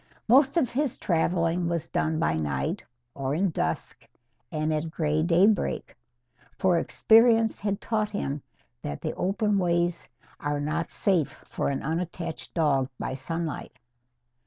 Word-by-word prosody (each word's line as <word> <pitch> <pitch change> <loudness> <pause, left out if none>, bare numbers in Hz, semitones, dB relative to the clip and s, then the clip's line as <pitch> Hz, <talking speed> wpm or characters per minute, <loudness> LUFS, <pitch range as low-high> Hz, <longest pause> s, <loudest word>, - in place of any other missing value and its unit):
Most 270 +6 +5
of 265 -8 +2
his 275 0 -1
travelling 170 -1 +1
was 170 -2 -2
done 160 0 0
by 80 - +1
night 70 -4 -2 0.3
or 135 +1 -2
in 185 +2 +1
dusk 80 - -3 0.4
and 155 -1 0
at 155 +1 -1
grey 155 -1 0
daybreak. 180 +5 +2 0.6
For 180 -3 +3
experience 225 +2 +4
had 200 -1 -1
taught 215 -2 -1
him 145 -9 -3 0.4
that 145 - -5
the 155 - -2
open 205 +2 +1
ways 175 -1 0 0.3
are 145 0 -1
not 155 +3 -2
safe 180 -7 +1
for - - -2
an 140 - -2
unattached 165 +1 -4
dog 140 -5 +2
by - - -3
sunlight. 155 +4 -4
170 Hz, 135 wpm, -27 LUFS, 150-200 Hz, 0.6 s, Most